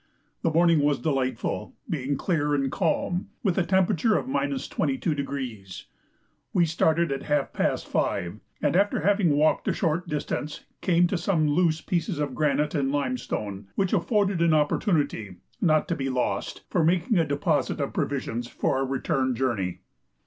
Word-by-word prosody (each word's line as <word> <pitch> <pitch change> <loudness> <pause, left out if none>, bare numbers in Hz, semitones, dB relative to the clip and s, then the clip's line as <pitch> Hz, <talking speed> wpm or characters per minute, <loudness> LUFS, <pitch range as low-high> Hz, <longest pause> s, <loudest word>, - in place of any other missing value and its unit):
The - - +2
morning 165 0 +4
was 145 -1 +2
delightful, 130 -6 -2
being 140 -2 -2
clear 150 -4 0
and 135 -2 0
calm, 175 +1 0 0.2
with 190 -6 +2
a - - +3
temperature 190 +4 +2
of - - -2
22°. 140 - -2 0.7
We 175 - +4
started 160 0 +1
at 135 0 -2
half 145 -2 0
past - - 0
5, 95 +1 -1 0.2
and - - +2
after 200 -1 +2
having 195 -4 +3
walked 155 +1 +2
a - - +2
short 170 0 -1
distance 150 0 -3 0.2
came 175 -1 +3
to 175 0 -1
some 165 -3 +1
loose 160 +1 +2
pieces 180 -1 -1
of 145 -3 -2
granite 150 0 +1
and 135 -3 0
limestone, 125 -8 -3
which 195 0 0
afforded 200 -1 +1
an 165 -2 +4
opportunity, 145 - 0 0.3
not 155 -3 +3
to 170 - +1
be 135 -2 -2
lost, 125 -1 -2
for 175 - +1
making 175 +4 +2
a - - +4
deposit 145 -2 0
of - - -2
provisions 120 +1 -2
for 130 - -1
our 135 - +1
return 130 -1 0
journey. 115 -8 -1
150 Hz, 155 wpm, -26 LUFS, 135-170 Hz, 0.7 s, morning